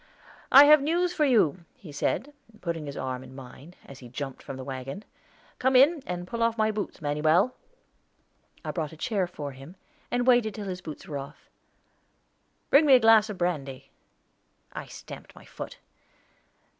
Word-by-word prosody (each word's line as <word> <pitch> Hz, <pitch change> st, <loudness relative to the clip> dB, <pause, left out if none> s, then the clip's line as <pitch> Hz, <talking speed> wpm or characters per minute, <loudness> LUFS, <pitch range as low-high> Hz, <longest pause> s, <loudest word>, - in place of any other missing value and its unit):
"I 275 Hz, +2 st, +10 dB
have 300 Hz, +1 st, +8 dB
some 280 Hz, -, -5 dB
news 350 Hz, +3 st, +1 dB
for 305 Hz, -, +2 dB
you," 190 Hz, -, +2 dB
he 165 Hz, -, -12 dB
said, 260 Hz, -, -2 dB, 0.3 s
putting 165 Hz, -4 st, -4 dB
his 140 Hz, -, -7 dB
arm 130 Hz, -1 st, -4 dB
in 130 Hz, 0 st, -13 dB
mine, 135 Hz, +6 st, -12 dB
as 135 Hz, -, -12 dB
he 125 Hz, -, -12 dB
jumped 135 Hz, +2 st, -6 dB
from 135 Hz, -, -8 dB
the 130 Hz, -, -7 dB
wagon. 135 Hz, +8 st, -7 dB, 0.5 s
"Come 260 Hz, +1 st, +2 dB
in, 285 Hz, +5 st, +5 dB
and 180 Hz, 0 st, -4 dB
pull 230 Hz, +5 st, -5 dB
off 230 Hz, 0 st, +1 dB
my 220 Hz, 0 st, +2 dB
boots, 205 Hz, -6 st, -5 dB
Manuel." 155 Hz, +10 st, +2 dB, 1.1 s
I -, -, -2 dB
brought 160 Hz, -3 st, -4 dB
a -, -, -12 dB
chair 195 Hz, +1 st, -1 dB
for 150 Hz, -5 st, -7 dB
him, 135 Hz, +7 st, -13 dB, 0.3 s
and 245 Hz, 0 st, 0 dB
waited 240 Hz, -5 st, +3 dB
till 210 Hz, -, -6 dB
his 185 Hz, -1 st, -5 dB
boots 160 Hz, +2 st, -9 dB
were 145 Hz, -4 st, -4 dB
off. 140 Hz, +2 st, -11 dB, 1.2 s
"Bring 295 Hz, +2 st, +6 dB
me 270 Hz, -, +8 dB
a -, -, +6 dB
glass 225 Hz, -1 st, +5 dB
of 205 Hz, -, -6 dB
brandy." 145 Hz, -7 st, -3 dB, 0.8 s
I -, -, -7 dB
stamped -, -, -11 dB
my -, -, -15 dB
foot. -, -, -9 dB
180 Hz, 180 wpm, -27 LUFS, 140-240 Hz, 1.2 s, I